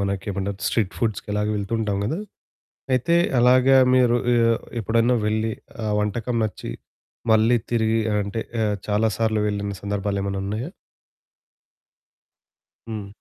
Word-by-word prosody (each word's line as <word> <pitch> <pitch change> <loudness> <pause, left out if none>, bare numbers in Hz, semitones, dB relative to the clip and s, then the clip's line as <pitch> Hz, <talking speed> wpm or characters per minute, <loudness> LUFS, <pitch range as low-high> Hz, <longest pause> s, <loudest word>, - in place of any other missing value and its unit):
మనకేమంటారు, 100 0 -3
street 105 -5 0
ఫుడ్స్‌కి 110 -3 -2
అలాగే 105 0 0
వెళ్తూ 100 +1 -4
ఉంటాం 105 -3 -1
కదా! 155 - -1 0.8
అయితే 170 +7 +2 0.2
అలాగా 130 +2 +5 0.2
మీరు 120 -1 +4 0.2
ఆహ్, 115 -1 +3 0.2
ఎప్పుడైనా 115 +3 +2
వెళ్ళి 110 +1 0 0.3
ఆ - - 0
వంటకం 115 +3 -1
నచ్చి, 105 -3 -5 0.6
మళ్లీ 110 +2 +4
తిరిగి 115 -1 +2 0.2
అంటే 100 +3 -3 0.2
ఆహ్, 105 -1 +1
చాలా 105 +2 +2
సార్లు 110 -2 +1
వెళ్లిన 100 -1 -3
సందర్భాలేమైనా 100 -1 -2
ఉన్నాయా? 110 - -3 2.2
హ్మ్. 105 -3 -5
110 Hz, 120 wpm, -23 LUFS, 100-115 Hz, 2.2 s, అలాగా